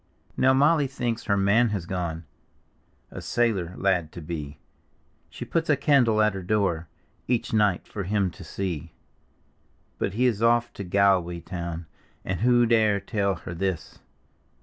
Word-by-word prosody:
Now 130 - +4
Molly 145 +2 +4
thinks 120 -3 -3
her 100 -1 +1
man 105 +5 +3
has 100 -5 -3
gone 85 -2 -3 0.9
A - - -7
sailor 100 -8 0
lad 90 -5 +1
to 85 - -8
be; 75 -3 -6 0.7
She - - -8
puts 165 -1 -1
a 145 - +4
candle 125 -7 +3
at 105 -1 +2
her 95 - -5
door 90 -4 0 0.4
Each 120 -2 -1
night 105 -4 +2
for 100 - -5
him 100 -1 0
to - - -12
see. 85 -5 -5 1.1
But 100 - -2
he 125 +3 +2
is 115 -4 +1
off 120 +1 +3
to 100 - -6
Galway 90 -2 +2
town, 85 -2 -5 0.4
(And 95 -1 -2
who 120 +1 +4
dare 110 -3 +3
tell 100 -1 -1
her 85 -1 -8
this?) 95 -1 -3
100 Hz, 155 wpm, -25 LUFS, 90-115 Hz, 1.1 s, Now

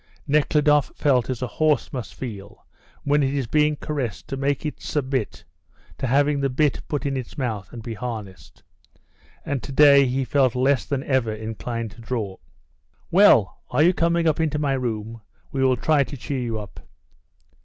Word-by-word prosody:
Nekhludoff 150 -1 +3
felt 130 -5 +2
as 130 -1 -3
a - - -1
horse 150 -6 +2
must 110 -6 -6
feel 105 -5 -8 0.4
when 145 +1 +2
it 135 0 0
is 135 -3 -1
being 150 +4 +2
caressed 135 -9 -4
to - - -3
make 140 +2 -1
it 150 - -4
submit 130 -6 -2 0.6
to 130 - -1
having 140 +3 +2
the 135 0 0
bit 140 +2 +1
put 145 -2 -3
in 140 -1 -1
its 130 +3 -6
mouth 110 -8 -3
and 115 -2 -9
be 115 - -5
harnessed, 110 -4 -7 0.8
and 140 -3 -2
to 105 - -8
day 140 -1 +6
he 130 +1 -1
felt 130 -3 +2
less 130 +1 +2
than 140 -1 -2
ever 130 -6 +1
inclined 110 +1 -5
to 115 - -14
draw. 110 -5 -4 0.7
"Well, 165 - +5
are 150 - +3
you 175 +3 +5
coming 170 0 +1
into 155 -1 +1
my 145 -2 0
room? 115 -3 -3 0.3
We 135 -1 0
will 130 -1 +3
try 150 +3 +3
to 140 +2 -8
cheer 135 +2 -4
you 115 -2 -2
up." 105 -5 -9
130 Hz, 175 wpm, -23 LUFS, 115-145 Hz, 0.8 s, day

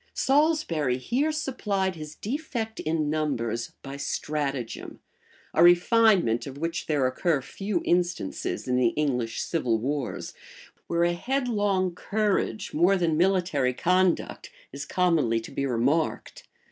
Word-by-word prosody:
Salisbury 270 - +2
here 260 - 0
supplied 210 -11 -1
his 155 -1 -8
defect 230 -3 -4
in 155 -1 -1
numbers 130 -7 -2
by 135 0 -7
stratagem, 140 -3 -3 0.5
a - - +3
refinement 175 - +4
of 135 0 -8
which 165 +3 -3
there 145 -4 +1
occur 140 +4 +1
few 180 +8 -3
instances 175 - -1
in 125 0 +1
the 120 -2 +2
English 125 -6 -1
civil 125 -9 0
wars, 135 +3 -3 0.5
where 170 0 +1
a 175 0 +2
headlong 205 -5 0
courage, 210 +3 -1
more 180 +5 +4
than 170 -3 +1
military 175 -7 +1
conduct, 185 +4 +1 0.2
is 140 +1 -6
commonly 160 -11 +2
to 115 - -10
be 140 0 -2
remarked. 135 +6 -1
165 Hz, 125 wpm, -26 LUFS, 135-195 Hz, 0.5 s, refinement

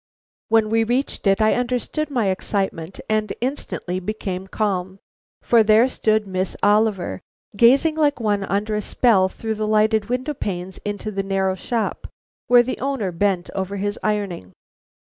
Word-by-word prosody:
When 220 -1 +3
we 225 0 +3
reached 245 -1 -1
it 195 +1 +3
I 215 - +4
understood 250 +5 -2
my 240 -8 0
excitement 190 -3 -3
and 215 0 0
instantly 240 -8 -3
became 190 -1 -4
calm. 190 -2 -2 0.5
For 235 -1 +5
there 220 +3 +5
stood 215 -4 +1
Miss 185 -1 -3
Oliver, 205 - +2 0.3
gazing 270 +9 +4
like 295 -3 +2
one 205 -3 0
under 205 +2 -1
a 210 - 0
spell 200 -4 +3
through 220 +3 -4
the 215 0 -3
lighted 215 0 +2
window 255 +4 -1
panes 185 -7 -5
into 205 +1 -4
the 195 -1 -2
narrow 195 -1 0
shop 225 +4 -3 0.4
where 245 0 +6
the 255 - -4
owner 265 -8 -2
bent 185 0 0
over 190 +1 -3
his 205 +1 -3
ironing. 200 - -2
210 Hz, 155 wpm, -22 LUFS, 195-230 Hz, 0.5 s, where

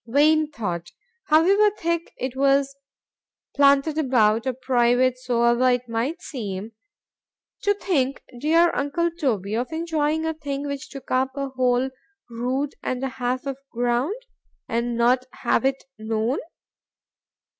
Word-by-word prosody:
—Vain 300 +5 +4
thought! 175 - -4 0.4
however 385 +7 +5
thick 335 0 -2
it 260 0 -4
was 275 0 +2 0.8
planted 280 +2 +4
about,——or 245 -3 +2
private 250 0 +2
soever 240 0 +2
it 245 0 0
might 240 +10 -2
seem,—to 225 - -6
think, 275 -10 -1 0.2
dear 330 +5 +4
uncle 335 +5 0
Toby, 230 - -1
of 245 +6 -2
enjoying 320 -1 -1
a 320 - 0
thing 285 -2 -4
which 280 -1 -5
took 275 - -10
up 260 +1 +2
a 275 -1 -2
whole 255 0 +1 0.4
rood 255 +5 -2
and 255 +1 -3
a 270 - 0
half 255 0 -3
of 275 -1 -3
ground,—and 240 - -3
not 250 +2 +3
have 235 0 0
it 270 0 0 0.2
known! 220 +4 -1
265 Hz, 125 wpm, -24 LUFS, 240-300 Hz, 0.8 s, however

